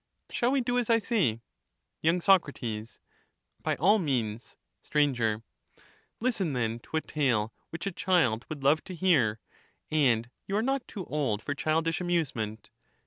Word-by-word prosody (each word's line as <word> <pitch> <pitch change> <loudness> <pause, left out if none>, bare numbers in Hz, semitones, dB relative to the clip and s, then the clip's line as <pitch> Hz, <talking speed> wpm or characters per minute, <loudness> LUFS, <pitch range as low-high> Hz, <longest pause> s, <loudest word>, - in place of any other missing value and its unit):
Shall 245 0 +1
we 275 -1 +2
do 245 +1 +1
as 240 - -2
I 230 - +6
say? 190 - +1 0.6
y. 165 +3 +4
Soc, 185 -3 +4 1.1
By - - 0
all 205 +7 +4
means. 120 - -2 0.2
Sir, 120 -7 +1 0.8
Listen, 210 - 0
then, 115 -2 -1
to 160 - -4
a - - +1
tale 120 -9 0 0.2
which 165 - -6
a 195 - -1
child 165 -12 +2
would 150 -3 -6
love 145 +3 +4
to 185 - -7
hear; 145 - +3 0.5
and 125 -6 +2 0.2
you 195 - -2
are 220 - +1
not 270 +1 -1
too 190 -5 -6
old 125 -8 -1
for 145 - -2
childish 160 +3 0
amusement. 135 - -2
155 Hz, 150 wpm, -29 LUFS, 120-190 Hz, 1.1 s, I